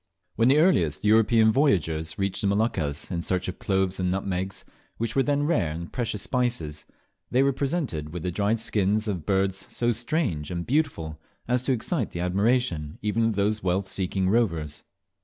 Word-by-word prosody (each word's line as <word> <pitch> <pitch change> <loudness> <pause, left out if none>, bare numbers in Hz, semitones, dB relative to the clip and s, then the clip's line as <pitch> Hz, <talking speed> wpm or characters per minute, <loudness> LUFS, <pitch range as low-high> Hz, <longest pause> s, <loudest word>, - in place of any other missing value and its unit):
When 115 +1 +3
the 135 +3 +5
earliest 130 - +2
European 110 +1 +5
voyagers 80 - +1
reached 95 -1 -1
the 100 - +1
Moluccas 100 -8 -1
in 85 -2 -1
search 90 +1 -1
of 90 - -5
cloves 95 -1 0
and 90 -1 0
nutmegs, 95 0 -3 0.3
which 115 0 -2
were 135 - +4
then 145 +1 +1
rare 145 - +1
and 85 +2 -7
precious 115 -5 -2
spices, 120 - -2 0.4
they 130 +2 +3
were 140 0 +2
presented 135 - -2
with 85 -1 -6
the 90 - -1
dried 105 +5 0
shins 105 0 +1
of 90 -7 -3
birds 95 -1 0
so 120 0 0
strange 115 - -1
and 85 -1 -3
beautiful 120 - -1 0.3
as 125 0 +2
to 130 - -1
excite 125 - -1
the 85 - -6
admiration 90 -4 0
even 110 +2 +1
of 115 -2 +1
those 105 +2 0
wealth 95 +1 0
seeking 95 0 0
rovers. 85 -9 0
100 Hz, 175 wpm, -26 LUFS, 90-120 Hz, 0.4 s, the